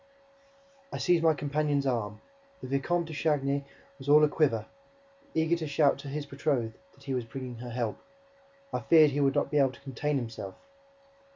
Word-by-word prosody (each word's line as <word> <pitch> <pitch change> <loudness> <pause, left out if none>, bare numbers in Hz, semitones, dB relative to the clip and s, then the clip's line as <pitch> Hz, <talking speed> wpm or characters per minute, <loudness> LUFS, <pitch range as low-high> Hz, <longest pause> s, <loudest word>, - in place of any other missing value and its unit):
I - - -4
seized 175 -2 +2
my 160 -1 +5
companion's 145 0 0
arm: 110 -5 -1 0.4
the - - -7
Vicomte 150 +6 0
de 160 - -8
Chagny 140 -2 0 0.3
was 135 +1 -6
all 150 +1 +7
a - - +7
quiver, 125 -8 +1 0.7
eager 160 +1 +3
to 160 -2 -4
shout 140 -1 +3
to 140 - -8
his 145 +1 -4
betrothed 135 -5 -1 0.2
that 140 - -20
he 135 - -3
was 125 -2 -1
bringing 125 0 -7
her 120 +1 -7
help. 115 -2 -2 0.7
I - - 0
feared 155 -3 +6
that - - -7
he 145 - 0
would 135 0 +2
not 145 - +1
be 150 - +3
able 135 -2 +3
to - - -16
contain 140 +2 -2
himself. 115 -6 -5
140 Hz, 190 wpm, -29 LUFS, 130-150 Hz, 0.7 s, all